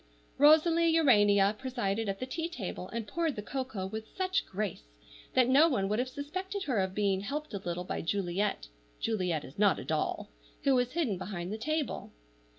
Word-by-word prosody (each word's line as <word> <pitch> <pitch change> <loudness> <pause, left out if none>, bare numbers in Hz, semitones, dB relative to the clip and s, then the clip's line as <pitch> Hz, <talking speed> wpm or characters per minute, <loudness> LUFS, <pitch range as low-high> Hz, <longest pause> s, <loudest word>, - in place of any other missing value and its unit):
Rosalie 320 +3 +6
Urania 205 -9 +5
presided 225 -5 -2
at 195 - -3
the 255 - -3
tea 325 +6 -3
table, 195 - -5
and 230 -2 -4
poured 330 0 -1
the 210 - -5
cocoa 250 -6 -4
with 220 +3 -6
such 375 +1 0
grace 205 0 -3 0.5
that 255 -2 +5
no 285 +6 +6
one 200 -9 0
would 210 +3 0
have 255 +1 -1
suspected 370 +9 -4
her 250 -7 0
of 190 0 -1
being 195 -2 +1
helped 295 +8 -4
a 200 - -2
little 175 -1 -4
by - - -3
Juliet 195 - -1 0.3
(Juliet 180 -8 -1
is 135 - -12
not 205 -2 +4
a - - -6
doll), 155 - -2 0.3
who 275 - +4
was 250 -1 +1
hidden 265 - 0
behind 185 -1 -5
the - - -3
table. 310 +4 -2
220 Hz, 185 wpm, -31 LUFS, 195-290 Hz, 0.5 s, Rosalie